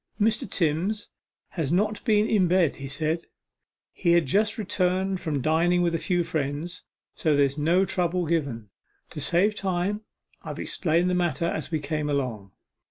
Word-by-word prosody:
'Mr. 215 -1 +1
Timms 180 +5 0 0.4
has 160 -5 -2
not 210 +4 +1
been 215 -2 +3
in 195 -6 +3
bed,' 175 -4 +2
he 135 - -6
said; 155 +4 -2 0.7
'he 170 -2 +2
had 170 -2 +4
just 210 +10 +1
returned 190 -2 0
from 150 -7 -2
dining 175 +3 +3
with 170 -1 +1
a 165 - 0
few 175 -1 0
friends, 160 +2 -3 0.3
so 155 -2 +1
there's 140 -1 +2
no 175 +6 +3
trouble 180 -1 0
given. 140 -11 -2 0.4
To 150 - -5
save 180 +8 +3
time 195 +1 -1 0.4
I - - -6
explained 175 +1 0
the - - +1
matter 170 -3 0
as 160 -2 -2
we 160 - 0
came 150 +1 -2
along. 120 -9 -2
170 Hz, 165 wpm, -26 LUFS, 150-185 Hz, 0.7 s, had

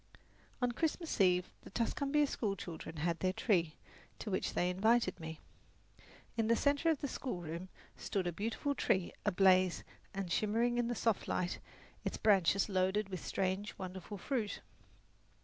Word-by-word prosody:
On 245 - +3
Christmas 320 - -1
Eve 180 -1 +3
the - - -11
Tuscumbia 280 +7 +1
schoolchildren 190 - -4
had 170 -1 0
their 185 +1 +2
tree, 170 -8 +1 0.4
to 215 - -5
which 185 - -1
they 175 - +2
invited 205 0 +2
me. 160 -1 -6 1.0
In 225 -2 +1
the 230 - +5
centre 285 +6 +2
of 315 -4 +1
the 285 - -1
schoolroom 175 - -4 0.3
stood 195 -3 -2
a 175 - 0
beautiful 225 - -1
tree 190 -9 +1
ablaze 185 -1 +4 0.3
and 195 -3 -4
shimmering 230 +5 +2
in 240 - +1
the 240 - -1
soft 225 -3 +1
light, 180 -1 -1 0.4
its - - -2
branches 195 -2 +4
loaded 190 +1 +1
with 185 -3 -5
strange, 190 +2 -1
wonderful 190 +2 -6
fruit. 220 +1 -2
195 Hz, 150 wpm, -35 LUFS, 180-235 Hz, 1.0 s, the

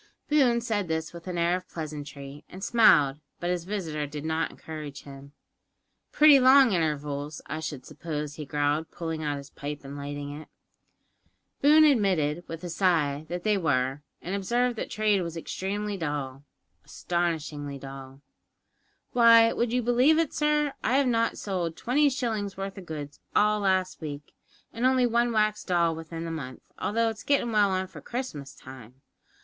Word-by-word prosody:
Boone 265 -6 +4
said 215 -5 -1
this 160 0 -3
with 170 +1 -11
an 180 -1 -3
air 170 +1 +2
of 185 0 -7
pleasantry, 145 -2 -7
and 190 +1 -10
smiled, 150 - +5 0.2
but 175 +1 -1
his 175 -2 -2
visitor 165 -7 -3
did 150 +1 -7
not 160 +1 0
encourage 150 -3 -8
him. 140 0 -12 0.8
"Pretty 300 -2 +7
long 260 -1 +7
intervals, 150 -2 -2
I 155 - -4
should 155 -4 -6
suppose," 150 -3 -5
he 150 - -7
growled, 145 +2 -1
pulling 165 -2 -5
out 145 -2 -2
his 140 0 -10
pipe 145 0 -6
and 140 +1 -8
lighting 145 0 -5
it. - - -14 1.1
Boone 305 +2 +7
admitted, 185 - +2
with 165 +1 -7
a 175 - -4
sigh, 160 -5 +1
that 175 0 -4
they 210 -2 +2
were, 135 -4 0 0.2
and 180 - -4
observed 240 +5 0
that - - -4
trade 215 -2 +1
was 170 -1 -5
extremely 200 +4 -3
dull 145 -4 -4 0.4
astonishingly 155 -5 -3
dull. 135 0 -10 0.9
"Why, 230 -1 +6
would 235 -1 0
you 250 0 +1
believe 250 +6 +4
it, 325 -3 +1
sir, 300 -1 +1
I 260 - +2
have 280 - +3
not 230 -1 +1
sold 175 -5 -3
twenty 285 +4 +2
shillings' 220 -7 -3
worth 195 +1 -5
o' - - -8
goods 150 -4 -7 0.2
all 210 0 +4
last 185 -2 0
week, 145 -1 -7 0.4
and 230 - -4
only 255 -1 +4
one 240 0 +2
wax 215 -1 +1
doll 170 -3 +2
within 165 +1 -7
the 165 - -4
month, 130 -6 -7 0.2
although 230 +2 +1
it's 220 -1 -7
gettin' 275 -4 +1
well 210 -2 +4
on 190 0 0
for 185 - -12
Christmas 195 - -6
time? 130 0 -13
170 Hz, 170 wpm, -27 LUFS, 150-220 Hz, 1.1 s, Pretty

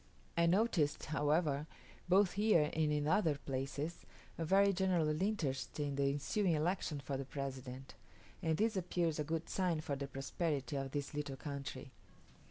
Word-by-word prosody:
I 170 0 +4
noticed, 175 -5 +2
however, 150 -1 +1 0.4
both 190 0 +5
here 200 -7 +3
and 155 -1 +2
in 150 0 +1
other 160 -2 +3
places, 140 +4 -4 0.3
a 165 - -3
very 195 +4 +4
general 175 -4 +1
interest 155 -11 -1
in 145 -1 -1
the 140 0 +2
ensuing 165 +7 +1
election 160 -1 0
for 135 0 -3
the 135 - -4
President; 135 -2 -6 0.5
and 160 -1 +1
this 220 0 +2
appears 170 -3 0
a - - +1
good 160 +2 -2
sign 180 -4 0
for 145 -2 -2
the 140 0 -4
prosperity 140 0 -2
of 135 -1 -2
this 145 0 -3
little 145 -2 -3
country. 140 -2 -6
150 Hz, 160 wpm, -36 LUFS, 140-175 Hz, 0.5 s, both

